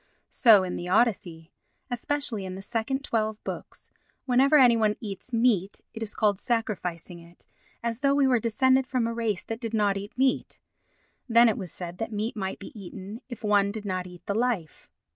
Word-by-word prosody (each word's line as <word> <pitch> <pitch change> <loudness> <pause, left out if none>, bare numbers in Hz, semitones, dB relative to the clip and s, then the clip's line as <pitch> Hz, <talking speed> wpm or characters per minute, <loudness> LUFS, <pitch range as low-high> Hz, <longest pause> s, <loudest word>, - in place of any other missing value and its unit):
So 220 -7 +6
in 180 - -3
the 175 - -5
Odyssey, 180 -6 +1 0.4
especially 245 -3 -1
in 185 -1 -6
the 190 - -7
second 235 +6 -2
twelve 220 -4 -1
books, - - -8 0.3
whenever 270 +4 +4
any 250 -4 +7
one 215 -2 +2
eats 210 +1 -7
meat 225 -5 +1
it 225 - -8
is 215 -2 -5
called 205 -3 +2
"sacrificing" 190 -7 -3
it, 170 +1 -17 0.4
as 230 0 -2
though 280 0 +2
we 280 -1 +4
were 255 -3 +3
descended 260 +4 +2
from 255 -3 0
a 230 - -2
race 225 -5 -1
that 225 0 -5
did 230 -1 -3
not 205 -2 +2
eat 200 +4 -8
meat. 265 0 0 0.7
Then 235 +1 +6
it 220 - +2
was 180 - -6
said 175 0 -7
that 225 - -3
meat 215 +2 -3
might 190 -3 -3
be 195 - -10
eaten 200 +2 -9
if 240 - -8
one 205 -1 +3
did 215 0 -7
not 185 -2 -2
eat 180 -1 -14
the 200 - -1
life. 220 - -2
220 Hz, 195 wpm, -27 LUFS, 195-240 Hz, 0.7 s, any